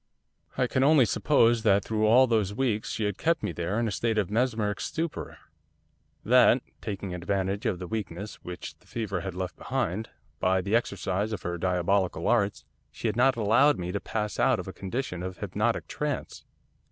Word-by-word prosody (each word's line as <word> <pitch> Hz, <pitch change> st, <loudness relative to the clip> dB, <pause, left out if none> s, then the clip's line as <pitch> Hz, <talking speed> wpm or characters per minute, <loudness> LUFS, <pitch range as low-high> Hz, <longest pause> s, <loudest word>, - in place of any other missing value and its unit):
'I 130 Hz, -, +3 dB
can 130 Hz, +1 st, +1 dB
only 145 Hz, -3 st, +6 dB
suppose 115 Hz, -1 st, +3 dB
that 100 Hz, -2 st, +3 dB
through 110 Hz, -1 st, +1 dB
all 125 Hz, +4 st, +7 dB
those 110 Hz, -5 st, 0 dB
weeks 115 Hz, -5 st, 0 dB
she 110 Hz, -, -2 dB
had 105 Hz, -2 st, -2 dB
kept 165 Hz, 0 st, +1 dB
me -, -, -1 dB
there 85 Hz, +6 st, -2 dB
in 120 Hz, -, +1 dB
a -, -, -2 dB
state 115 Hz, +2 st, -1 dB
of 100 Hz, -3 st, 0 dB
mesmeric 110 Hz, -3 st, 0 dB
stupor. 165 Hz, -1 st, -4 dB, 0.9 s
That, -, -, +5 dB, 0.2 s
taking 100 Hz, -2 st, -5 dB
advantage 95 Hz, +2 st, -1 dB
of 90 Hz, -, 0 dB
the 90 Hz, -, -6 dB
weakness 105 Hz, -1 st, -5 dB
which 90 Hz, 0 st, -7 dB
the -, -, -26 dB
fever 100 Hz, -6 st, -3 dB
had 95 Hz, -2 st, -5 dB
left 90 Hz, -1 st, -4 dB
behind, 105 Hz, +7 st, -2 dB, 0.3 s
by 95 Hz, 0 st, +2 dB
the 100 Hz, +4 st, 0 dB
exercise 100 Hz, -2 st, -1 dB
of 105 Hz, -, -5 dB
her 85 Hz, 0 st, -3 dB
diabolical 90 Hz, -1 st, +1 dB
arts, 105 Hz, -4 st, +1 dB, 0.2 s
she -, -, -4 dB
had 105 Hz, -, -1 dB
not 130 Hz, +2 st, +4 dB
allowed 115 Hz, +7 st, +4 dB
me 90 Hz, 0 st, -4 dB
to 100 Hz, -, -2 dB
pass 105 Hz, 0 st, -3 dB
out -, -, +3 dB
of -, -, -6 dB
a -, -, -6 dB
condition 95 Hz, -2 st, -4 dB
of 95 Hz, 0 st, -5 dB
hypnotic 105 Hz, +4 st, -1 dB
trance. 150 Hz, -2 st, -4 dB
105 Hz, 190 wpm, -27 LUFS, 95-115 Hz, 0.9 s, all